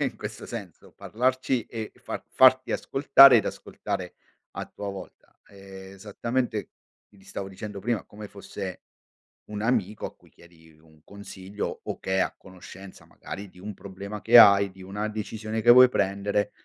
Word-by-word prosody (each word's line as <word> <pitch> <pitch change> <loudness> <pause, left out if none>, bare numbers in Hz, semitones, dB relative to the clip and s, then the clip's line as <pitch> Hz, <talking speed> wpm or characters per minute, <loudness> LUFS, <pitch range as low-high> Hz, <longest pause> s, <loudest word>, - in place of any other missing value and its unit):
in - - -2
questo - - -8
senso, - - -9
parlarci 130 +1 -1
e 110 -2 -7
far - - -7
farti 130 0 +5
ascoltare 135 -2 +6
ed 110 - +2
ascoltare - - -5 0.4
a - - -4
tua 100 -1 -8
volta 95 - -12
esattamente, 100 +4 -5 0.4
ti 100 -2 -22
stavo 95 -1 -7
dicendo 100 +1 -8
prima, 120 +2 -2
come 105 0 -11
fosse 100 -2 -8 0.7
un 105 0 -5
amico 110 -4 -1
a - - -8
cui - - -24
chiedi 80 -1 -20
un 80 -1 -23
consiglio 100 0 -7
o - - -6
che 95 0 -2
è - - +2
a - - 0
conoscenza 95 +1 -13
magari 100 +4 -9
di 90 - -19
un 105 +2 -7
problema 100 +2 -9
che 120 +2 +6
hai, 100 -3 +8
di 95 0 -16
una 105 +3 -4
decisione 110 +1 -5
che 120 - +7
vuoi 125 0 +8
prendere, 100 0 -1
100 Hz, 160 wpm, -26 LUFS, 95-110 Hz, 0.7 s, hai